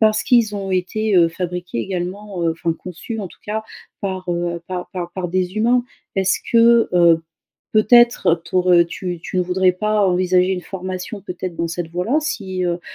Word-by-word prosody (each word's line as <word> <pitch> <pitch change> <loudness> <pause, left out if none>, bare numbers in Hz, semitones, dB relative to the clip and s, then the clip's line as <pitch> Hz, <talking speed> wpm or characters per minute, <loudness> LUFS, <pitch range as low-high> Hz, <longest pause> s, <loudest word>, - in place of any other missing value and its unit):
parce 215 -1 +3
qu'ils 230 -4 +3
ont 195 -1 -4
été, 190 +3 0
heu, 170 -2 +6
fabriqués 180 -3 -4
également, 185 - -4
heu, 165 - +2
enfin 165 0 -2
conçus 180 +7 -7
en 195 - -4
tout - - -16
cas, 220 +1 -3 0.4
par, 190 -2 -4
heu, 170 0 -2
par 180 -1 -5
par 175 -2 -4
par 185 -2 -3
des 185 +1 -1
humains. 240 +3 +3 0.3
Est-ce 190 -1 +2
que, 235 0 +5
heu, 170 -2 +5 0.5
peut-être 235 -3 +5
t'aur 180 +1 +1
heu, 170 -1 +6
tu 175 +1 -5
tu 185 - -3
ne - - +3
voudrais 180 +1 +2
pas 210 +2 +1
envisager 185 0 +2
une 180 - -2
formation 185 +3 -6
peut-être 180 -2 -6
dans 170 - -1
cette 170 0 -4
voie-là? 180 - 0
Si, 190 -12 -3
heu, 175 0 -1
185 Hz, 185 wpm, -20 LUFS, 175-210 Hz, 0.5 s, heu